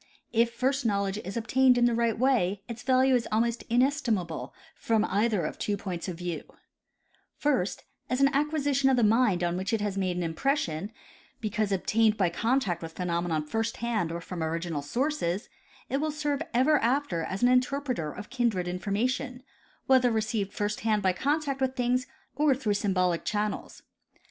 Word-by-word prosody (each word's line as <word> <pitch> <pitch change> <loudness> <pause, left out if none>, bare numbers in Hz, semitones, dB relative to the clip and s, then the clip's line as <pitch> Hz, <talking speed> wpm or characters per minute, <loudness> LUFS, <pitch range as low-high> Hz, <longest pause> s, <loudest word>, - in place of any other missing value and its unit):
If 230 0 +3
first 265 +3 0
knowledge 200 -2 0
is 195 +3 -6
obtained 255 +2 +4
in 240 - +4
the 240 - +3
right 230 -1 +1
way 210 -7 +1
its 235 -2 -7
value 260 +1 +3
is 245 -2 +2
almost 235 +2 +1
inestimable 230 - 0 0.2
from 220 -1 +1
either 210 -1 +1
of - - -5
two 205 -1 -1
points 185 -3 -5
of 180 -3 -5
vieAV: 175 -1 -4 0.9
First, 260 -10 0 0.3
as 255 - 0
an 275 0 +4
acquisition 285 -2 +2
of 260 - +3
the 240 - +3
mind 215 -4 +3
on 175 0 0
which 190 +5 -2
it 220 - +1
has 200 -1 -1
made 185 -2 -1
an 180 - -1
impression 170 - -1 0.5
because 215 -1 -1
obtained 215 +3 +2
by 180 -4 +2
contact 225 -1 0
with 165 -1 -7
phenomena 170 -3 -1
first 225 +6 -2
hand 225 -8 -1
or 170 +1 -4
from 175 0 -6
original 165 -1 -2
sources, 230 - -1 0.4
it 270 - -1
will 310 +2 0
serve 295 -2 -2
ever 270 +5 +4
after 245 - 0
as 190 +6 -4
an 245 - +6
interpreter 250 - +1
of 205 - -9
kindred 235 -9 0
information, 245 +8 -2 0.4
whether 260 -2 +5
received 220 -3 -1
first 210 0 -2
hand 215 -2 +1
by 185 -1 +3
contact 285 - -1
with 260 0 0
things 250 +2 0 0.3
or 290 -1 +3
through 240 -6 0
symbolic 185 -4 +1
channels. 210 0 -3
225 Hz, 175 wpm, -28 LUFS, 185-255 Hz, 0.9 s, an